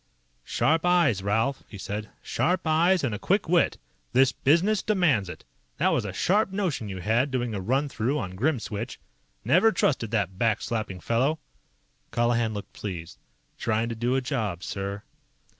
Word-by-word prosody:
"Sharp 150 - +1
eyes, 170 - +3
Ralph," 110 +7 0
he 105 - -9
said. 105 +2 -5
"Sharp 180 +1 0
eyes 170 +3 +3
and 125 -5 0
a 105 - -4
quick 200 0 +1
wit. 175 0 +3 0.4
This 130 +1 +5
business 185 +8 +2
demands 155 - +2
it. - - -9 0.3
That - - +3
was - - 0
a - - -3
sharp 205 +2 +1
notion 180 - -2
you 95 -2 -5
had, 115 +8 +2
doing 120 -3 -2
a 100 - -3
run 135 +9 +1
through 135 +2 -1
on 95 -9 -4
Grimswitch. 115 -2 -2 0.5
Never 220 +6 +5
trusted 135 - +1
that 100 -4 -1
back 115 -3 +2
slapping 110 -6 -3
fellow." 130 - +1 0.7
Colihan 120 -1 +1
looked 100 - -7
pleased. 85 - -7 0.4
"Trying 115 +1 0
to 115 - -3
do 120 +3 0
a 135 - +1
job, 110 - -2
sir." 100 +1 -4
120 Hz, 165 wpm, -26 LUFS, 105-155 Hz, 0.7 s, This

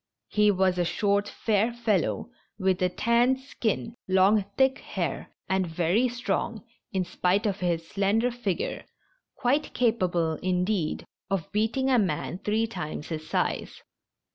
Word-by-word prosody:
He 210 0 +4
was 190 -2 +2
a - - +3
short, 200 +3 +1
fair 220 +1 +1
fellow, 230 -1 0 0.3
with 190 -2 +1
a 180 - +3
tanned 235 +6 +2
skin, 230 -4 -2
long 190 +2 +4
thick 265 0 +3
hair, - - -3 0.2
and 190 -1 +1
very 175 +9 +2
strong, 235 -2 -2 0.3
in 190 -2 0
spite 185 +5 +1
of 200 -2 0
his 170 -2 -1
slender 205 +6 +1
figure 225 -7 -2 0.3
— - - -44
quite 280 +5 +1
capable, 180 -9 +1
indeed, 180 -2 0 0.2
of 195 -4 -2
beating 230 +6 +1
a 250 - +5
man 180 -2 -1
three 215 +3 +1
times 155 -9 -5
his 155 -1 -5
size. - - -1
200 Hz, 140 wpm, -27 LUFS, 180-235 Hz, 0.3 s, a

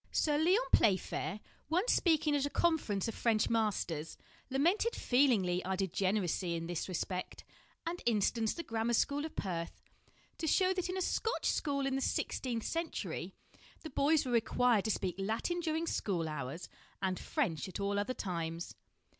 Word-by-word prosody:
Sir 300 -2 +2
Lyon 370 +9 +4
Playfair, 200 +1 +2 0.3
once 365 +9 +3
speaking 310 -3 +3
at 285 0 +1
a - - -5
con 325 +1 +3
ference 200 -5 -2
of 225 - -3
French 220 -1 +1
masters, 185 -8 -1 0.3
lamented 345 - +2
feelingly 220 -9 +3
our 190 0 -1
degeneracy 185 -2 0
in 165 0 -3
this 175 +2 -3
respect, 185 +1 -3 0.4
and 345 +2 -3
instanced 225 - +2
the 335 - -3
grammar 230 -3 -1
school 285 +5 +1
of 320 - -8
Perth 170 -4 -3 0.6
to 320 - -1
show 370 +4 +4
that 365 -1 -2
in 370 - -2
a 375 - 0
Scotch 450 +6 -1
school 280 -2 +1
in 270 - 0
the 270 - -1
sixteenth 240 -3 -1
century 330 0 -3 0.5
the 315 - -8
boys 290 +3 +3
were 255 - -2
required 235 -1 +3
to - - 0
speak 190 -3 0
Latin 220 - -1
during 325 -1 -1
school 180 - -1
hours, 150 +2 -5 0.3
and 190 -1 -1
French 195 - -1
at 185 - -6
all 200 0 0
other 255 +5 -2
times. 170 -3 -4
230 Hz, 165 wpm, -33 LUFS, 190-310 Hz, 0.6 s, Lyon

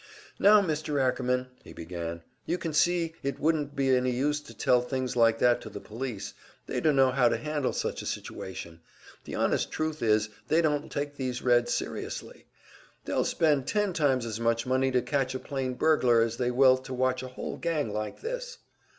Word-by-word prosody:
"Now, 205 0 +7
Mr. 155 -3 -1
Ackerman," 125 -1 0
he - - -12
began, 85 0 -6 0.2
"You 175 - 0
can 165 -3 -4
see 170 +1 +2
it 140 -1 -3
wouldn't 150 -2 0
be 135 -1 +1
any 125 0 +1
use 145 +4 0
to 145 - -13
tell 125 -1 +3
things 130 0 -3
like 115 -1 +4
that 120 0 +3
to - - -8
the - - -7
police. 115 -2 -6 0.3
They - - -2
dunno 135 -4 +4
how 125 -2 +4
to - - 0
handle 150 -3 -1
such - - -3
a - - -6
situation; 85 -3 -6 0.4
the - - -6
honest - - 0
truth 155 0 -2
is, 110 -1 +2 0.2
they 160 - +3
don't 150 -3 0
take 145 0 -3
these 125 -2 -3
Reds 120 -1 +3
serious. - - -3 0.8
They'll - - 0
spend 150 -5 +2
ten 210 -3 +1
times 135 -6 +1
as 110 -1 -4
much 115 0 +1
money 130 +1 +2
to 125 -1 +1
catch 135 -3 -1
a - - -2
plain 130 -3 -3
burglar 125 -7 +4
as 115 0 -2
they 125 -1 0
will 130 +1 +5
to 130 0 -7
watch 130 0 +1
a 130 - -6
whole 130 - -6
gang 155 -10 -1
like 105 0 -4
this." - - -5
130 Hz, 195 wpm, -28 LUFS, 120-150 Hz, 0.8 s, Now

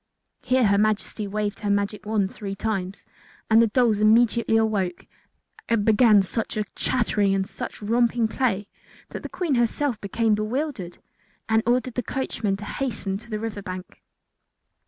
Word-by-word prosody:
Here 255 -1 +2
her 200 -1 +3
Majesty 215 0 0
waved 205 0 -3
the 205 - -2
magic 200 +1 -1
wand 210 -3 0
three 200 -2 -5
times, 195 -2 -3 0.5
and 225 +1 +7
the 230 - +4
dolls 225 -1 +2
immediately 225 +1 +4
awoke 200 -5 0 0.6
and 225 -3 +2
began 215 -2 +5
such 220 +3 -3
a 210 - 0
chattering 210 -5 +1
and 190 0 0
such 195 +2 -7
romping 235 +1 +2
play 220 -4 -1 0.4
that - - -6
the - - -7
Queen 360 -5 -1
herself 240 0 0
became 220 +2 +1
bewildered 215 - -2 0.5
and 220 0 +3
ordered 250 +1 +1
the 250 - -1
coachman 220 -5 -2
to 205 - -8
hasten 205 -6 -3
to 235 - -17
the 215 - -2
river 210 -2 -5
bank. 185 -2 -8
215 Hz, 155 wpm, -24 LUFS, 200-235 Hz, 0.6 s, and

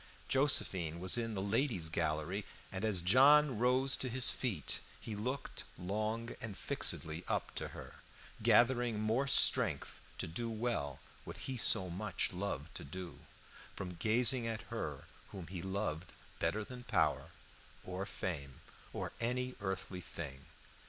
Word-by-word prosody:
Josephine 95 - +3
was 95 +1 +5
in 115 -2 -1
the 95 - -2
ladies' 100 - +1
gallery, 80 +4 -1 0.3
and 95 +1 -4
as 100 -6 +1
John 135 +5 +6
rose 130 +2 +3
to 130 - -2
his 130 +1 +4
feet 100 - -2 0.2
he 110 - -6
looked 125 +6 -3
long 110 +6 -2
and 105 -3 -5
fixedly 80 +2 -1
up - - -1
to - - -3
her, - - -10 0.4
gathering 120 -2 +4
more 115 +6 +1
strength 140 - +3 0.2
to - - -2
do 115 +9 -3
well 110 - -2 0.2
what - - -8
he 130 - -2
so 105 -4 +4
much 95 +1 -2
loved 90 -5 -4
to 85 - -8
do, 85 +4 -7 0.6
from 90 -1 -5
gazing 115 +6 +3
at 110 -1 -3
her - - -4 0.2
whom 95 -3 -7
he 90 +1 -6
loved 95 -3 -3 0.3
better 110 +1 0
than 125 +3 -9
power, 90 -11 +1 0.5
or 95 +2 -4
fame, 70 -7 -5 0.3
or - - -3
any 125 +2 -1
earthly 95 -1 -3
thing. 70 -6 -7
105 Hz, 145 wpm, -35 LUFS, 90-120 Hz, 0.6 s, John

